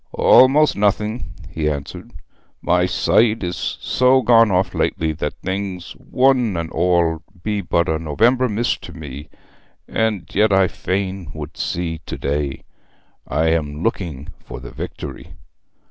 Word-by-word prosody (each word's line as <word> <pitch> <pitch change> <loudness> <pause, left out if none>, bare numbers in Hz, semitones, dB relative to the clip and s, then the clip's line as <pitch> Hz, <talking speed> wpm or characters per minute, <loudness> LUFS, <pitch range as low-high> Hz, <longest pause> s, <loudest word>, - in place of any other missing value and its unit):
'Almost 145 +4 +6
nothing,' 105 +3 0 0.2
he 75 -1 -2
answered. 70 -2 -6 0.5
'My - - +2
sight 110 -2 +2
is 90 -1 -3
so 130 +1 +3
gone 115 -2 +6
off 95 0 +1
lately 80 -1 0
that 75 -1 -4
things, 95 -1 -4
one 125 -7 +1
and 80 -1 -4
all, 85 -2 +1 0.2
be 105 -1 -1
but 85 -1 0
a 80 0 0
November 120 - +2
mist 110 +3 -1
to - - -10
me. 75 -2 -9 0.6
And 110 -4 -1
yet 105 +1 +3
I 95 -1 +4
fain 95 -1 -3
would 75 +1 -7
see 85 -2 -3
to - - -5
day. 70 -1 -2 0.6
I 80 +4 +1
am 75 -1 -1
looking 85 - -3
for - - -9
the - - -10
Victory.' - - -8
90 Hz, 140 wpm, -20 LUFS, 80-110 Hz, 0.6 s, Almost